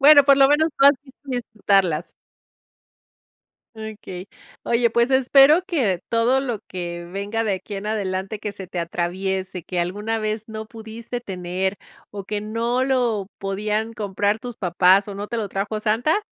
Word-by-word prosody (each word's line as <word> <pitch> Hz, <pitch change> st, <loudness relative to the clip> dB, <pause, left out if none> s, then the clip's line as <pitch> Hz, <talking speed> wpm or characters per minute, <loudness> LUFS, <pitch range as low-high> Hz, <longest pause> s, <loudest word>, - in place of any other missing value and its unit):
Bueno, 285 Hz, +1 st, +9 dB
por 275 Hz, -1 st, +6 dB
lo 270 Hz, -1 st, +7 dB
menos 310 Hz, +2 st, +4 dB
tú 275 Hz, -, +7 dB
has 285 Hz, -, +9 dB
visto 270 Hz, -2 st, -19 dB
disfrutarlas. 195 Hz, -, 0 dB, 1.6 s
Okey. 210 Hz, -4 st, -8 dB, 0.3 s
Oye, 235 Hz, 0 st, +2 dB
pues 235 Hz, +3 st, +2 dB
espero 275 Hz, +6 st, +6 dB
que 245 Hz, -, 0 dB
todo 235 Hz, +3 st, +2 dB
lo 245 Hz, -6 st, -3 dB
que 175 Hz, -1 st, -5 dB
venga 205 Hz, +3 st, -2 dB
de 215 Hz, -, 0 dB
aquí 205 Hz, +2 st, -9 dB
en 195 Hz, +2 st, -5 dB
adelante 195 Hz, -1 st, -2 dB
que 210 Hz, -1 st, -4 dB
se 190 Hz, -2 st, -8 dB
te 180 Hz, -, -4 dB
atraviese, 185 Hz, +2 st, -2 dB
que 175 Hz, +1 st, -2 dB
alguna 210 Hz, +6 st, -2 dB
vez 215 Hz, 0 st, -3 dB
no 220 Hz, 0 st, -6 dB
pudiste 225 Hz, +2 st, -7 dB
tener, 190 Hz, -2 st, -3 dB, 0.3 s
o 200 Hz, -1 st, -7 dB
que 210 Hz, +1 st, -3 dB
no 230 Hz, +4 st, -1 dB
lo 240 Hz, -7 st, +1 dB
podían 210 Hz, +3 st, -2 dB
comprar 205 Hz, 0 st, -1 dB
tus 245 Hz, 0 st, -7 dB
papás, 185 Hz, +2 st, +3 dB
o 200 Hz, -, -6 dB
no 205 Hz, +1 st, -5 dB
te 235 Hz, -, -4 dB
lo 210 Hz, -4 st, -2 dB
trajo 205 Hz, +2 st, -3 dB
Santa, 235 Hz, -, +2 dB
215 Hz, 165 wpm, -22 LUFS, 190-235 Hz, 1.6 s, Bueno